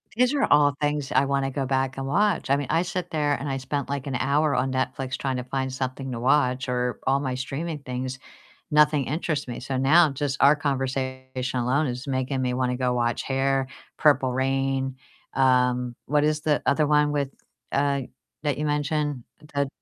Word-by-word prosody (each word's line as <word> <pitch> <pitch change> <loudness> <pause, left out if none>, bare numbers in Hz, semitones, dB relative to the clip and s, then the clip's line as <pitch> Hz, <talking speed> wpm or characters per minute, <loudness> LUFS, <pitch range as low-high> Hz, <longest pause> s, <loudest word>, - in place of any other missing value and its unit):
These 250 +3 +3
are 280 - +2
all 145 -1 +4
things 145 -1 -1
I 135 +2 +3
wanna 135 -1 0
go 135 0 -2
back 130 0 0
and 135 0 -3
watch. 200 0 +1
I 140 - +5
mean, 140 -2 -2
I 165 - +3
sit 180 0 -4
there 150 -2 +1
and 140 +2 -3
I 135 - -1
spent 135 +1 -3
like 140 -1 -3
an 135 - -2
hour 140 +3 +2
on 130 +1 0
Netflix 130 0 -2
tryna 130 -2 -3
find 130 -1 -1
something 130 0 -4
to 115 - -4
watch 130 0 +2
or 125 -2 -1
all 135 +1 +3
my 130 -2 -2
streaming 145 +5 -4
things. 130 -1 -5 0.5
Nothing 150 -2 +4
interests 150 -1 -2
me, 120 0 -6
so 135 0 -3
now, 155 +5 +5
just 140 0 -2
our 145 +2 +7
conversation 135 -2 -2 0.4
alone 135 +5 +1
is 125 +2 -4
making 130 0 -1
me 125 -1 0
wanna 125 0 0
go 125 -1 0
watch 120 -1 0
Hair, 135 0 0 0.3
Purple 140 -4 +3
Rain, 135 0 0 0.4
um, 125 -2 +2
what 145 0 +2
is 150 0 +1
the 150 -1 +1
other 150 -2 +3
one 150 0 +3
with, 140 -2 -1 0.4
uh, 140 0 +1 0.4
that 145 -2 0
you 150 - -2
mentioned? 145 -2 -1 0.3
Eh 140 - +3
th - - -7
135 Hz, 195 wpm, -25 LUFS, 130-145 Hz, 0.5 s, our